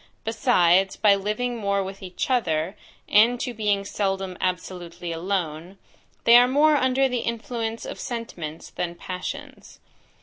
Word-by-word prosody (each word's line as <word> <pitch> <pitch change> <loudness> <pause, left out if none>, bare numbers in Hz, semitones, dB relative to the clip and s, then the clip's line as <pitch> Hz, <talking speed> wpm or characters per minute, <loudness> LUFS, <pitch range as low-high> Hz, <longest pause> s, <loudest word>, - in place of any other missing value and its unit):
Besides 195 -5 +3
by 205 -2 +5
living 215 +5 -2
more 200 -2 0
with 195 +1 -8
each 185 +7 -4
other, 175 -6 0 0.3
and 235 +4 +5
to 245 - -3
being 205 -3 0
seldom 195 -2 -2
absolutely 180 -1 -4
alone, 170 0 -3 0.5
they 235 +1 +8
are 245 +1 +6
more 295 +4 +4
under 265 0 +3
the 250 -2 -1
influence 230 0 -3
of - - -7
sentiments 175 -10 -6
than 175 -1 -4
passions. 270 +12 -7
200 Hz, 135 wpm, -24 LUFS, 180-240 Hz, 0.5 s, they